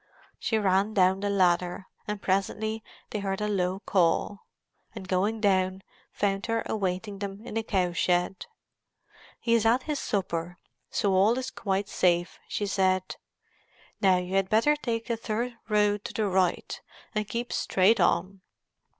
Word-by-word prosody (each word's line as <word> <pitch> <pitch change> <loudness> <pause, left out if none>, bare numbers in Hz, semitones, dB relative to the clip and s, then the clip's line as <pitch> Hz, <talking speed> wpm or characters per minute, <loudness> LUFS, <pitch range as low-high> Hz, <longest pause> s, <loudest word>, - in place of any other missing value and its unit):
She 225 - 0
ran 200 +1 +2
down 190 0 +4
the 205 +1 -1
ladder, 180 -1 +1 0.2
and 210 0 -3
presently 210 +3 -1 0.3
they 210 - -2
heard 195 -1 -2
a 210 - -1
low 190 -1 -1
call, 190 +2 +1 0.5
and 190 -3 -7
going 200 +4 +1
down, 190 -2 +2 0.3
found 195 +1 -1
her 230 0 0
awaiting 195 0 -2
them 200 +2 -6
in - - -7
the 225 - 0
cow 185 -5 0
shed. 180 +2 0 0.9
"He 230 - +1
is 230 -2 +4
at 235 +3 +3
his 300 -2 -2
supper, 175 -3 -2 0.3
so 200 -2 +1
all 205 +6 +4
is 260 0 -3
quite 195 -1 -2
safe," 175 -2 +1
she 205 - -2
said. 185 -1 0 0.8
"Now 190 -3 +5
you 180 +1 -4
had 195 -1 +2
better 230 +8 +4
take 230 -6 -3
the 235 - -2
third 230 +2 -2 0.2
road 210 -1 +2
to - - -5
the 215 -2 0
right, 185 -2 0 0.3
and 215 -2 -1
keep 235 +2 -3
straight 200 +5 +3
on. 195 0 +1
200 Hz, 160 wpm, -27 LUFS, 185-220 Hz, 0.9 s, Now